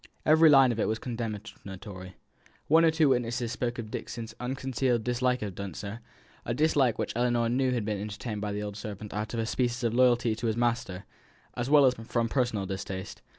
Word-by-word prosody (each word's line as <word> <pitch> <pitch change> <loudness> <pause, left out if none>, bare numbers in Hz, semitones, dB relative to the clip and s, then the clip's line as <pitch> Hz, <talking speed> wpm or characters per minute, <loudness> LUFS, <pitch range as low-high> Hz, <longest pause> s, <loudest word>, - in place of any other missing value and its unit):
Every 160 +1 +6
line 135 -3 +7
of 115 - -3
it - - +1
was 110 - 0
condemnatory. 100 -5 -7 0.5
One 160 +2 +5
or 165 - +6
two 160 -2 +3
witnesses 120 -2 0
spoke 120 -1 -2
of 110 -2 -6
Dixon's 115 0 -6
unconcealed 130 -2 -1
dislike 125 0 0
of 100 -3 -4
Dunster, 100 +3 -6 0.4
a 120 - -2
dislike 140 -5 +2
which - - -2
Ellinor 120 -1 +1
knew 130 +2 +1
had 120 -4 -1
been 105 -2 -2
entertained 105 +1 -5
by 105 -1 -2
the 105 +1 -3
old 105 -1 -5
servant 105 0 -7
out 105 +2 -3
of - - -2
a 115 - 0
species 120 +1 -1
of 115 -1 +1
loyalty 120 -2 +3
to 115 - -2
his 110 0 0
master, 120 -6 -1 0.5
as 120 +2 -2
well 145 -1 +7
as 130 - +5
from 115 0 -2
personal 120 -7 0
distaste. 95 -1 -6
120 Hz, 195 wpm, -28 LUFS, 105-125 Hz, 0.5 s, line